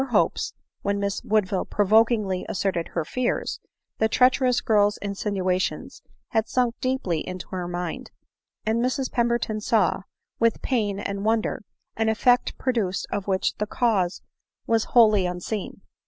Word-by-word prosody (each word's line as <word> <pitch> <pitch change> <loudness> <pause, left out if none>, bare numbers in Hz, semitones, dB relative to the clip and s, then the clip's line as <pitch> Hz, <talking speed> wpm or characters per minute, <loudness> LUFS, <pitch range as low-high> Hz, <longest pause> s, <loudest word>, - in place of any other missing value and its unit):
hopes - - +1 0.3
when 200 0 -1
Miss 200 -1 -2
Woodvflle 205 -3 0
provokingly 210 -2 +3
asserted 185 -3 -1
her 165 - +1
fiars, 255 +8 -2 0.4
the 220 - +3
treacherous 250 +1 +3
girl's 210 -1 +2
insinuations 195 -2 -2 0.3
had 220 -2 0
sunk 245 -2 +1
deeply 255 -11 0
into 185 +2 -6
her 180 -2 -4
mind, 175 -1 -4 0.6
and 220 +2 +1
Mrs 255 +1 -1
Pemberton 235 -2 0
saw, 210 -5 +2 0.4
with 230 -1 +2
pain 210 -6 0
and 200 -1 -4
wonder, 220 0 0 0.3
an 220 0 +1
effect 245 +3 +2
produced 220 -7 -1
of 200 -1 -3
which 190 -1 0
the 210 - -2
cause 205 -7 0 0.4
was 225 -1 +2
wholly 215 -6 +5
unseen. 180 +3 -5
210 Hz, 135 wpm, -25 LUFS, 190-230 Hz, 0.6 s, wholly